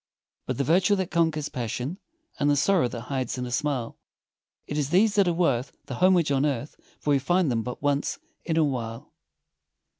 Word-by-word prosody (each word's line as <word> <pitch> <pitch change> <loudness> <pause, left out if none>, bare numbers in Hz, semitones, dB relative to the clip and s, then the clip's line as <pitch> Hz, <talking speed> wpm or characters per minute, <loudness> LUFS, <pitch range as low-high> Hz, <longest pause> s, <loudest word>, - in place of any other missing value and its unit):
But - - -2
the 140 - +1
virtue 180 - +3
that 190 -2 -2
conquers 160 -3 +1
passion, 125 - -4 0.4
And 145 - +2
the 145 - +4
sorrow 160 0 +3
that 120 -1 -6
hides 130 +1 -3
in 125 - -3
a 125 - -6
smile, 130 -3 -2 0.7
It 145 - -5
is 145 -2 0
these 200 +6 +4
that 200 -2 +3
are - - +3
worth 140 -7 0
the - - -6
homage 180 -5 +4
on 135 0 +2
earth 140 -1 -2 0.2
For 150 - -1
we 140 - +4
find 175 +1 +2
them 115 -1 0
but 125 +4 -6
once 145 0 0 0.3
in 165 -2 -1
a 160 - +5
while. 115 -5 -3
145 Hz, 200 wpm, -26 LUFS, 125-170 Hz, 0.7 s, a